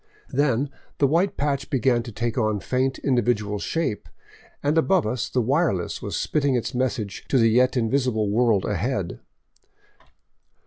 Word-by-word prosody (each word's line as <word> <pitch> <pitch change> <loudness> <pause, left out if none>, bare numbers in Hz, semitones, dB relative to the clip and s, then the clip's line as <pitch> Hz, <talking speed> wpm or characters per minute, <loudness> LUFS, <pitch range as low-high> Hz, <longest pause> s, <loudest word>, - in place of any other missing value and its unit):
Then 140 -1 +1 0.3
the 145 - +3
white 170 +8 +1
patch 140 -1 -1
began 125 -2 +2
to 115 0 -8
take 115 +1 -2
on 110 -4 0
faint 130 +4 -1
individual 110 -5 0
shape, 160 - -2 0.5
and 145 +2 +1
above 180 +2 +3
us 115 +1 -2
the 125 - 0
wireless 130 - 0
was - - -3
spitting 140 -3 +1
its 120 +2 -2
message 125 -5 -2
to 135 - +3
the 115 -2 +4
yet 125 +3 +3
invisible 120 -2 +1
world 110 -1 +2
ahead. - - -2
125 Hz, 145 wpm, -24 LUFS, 110-140 Hz, 0.5 s, the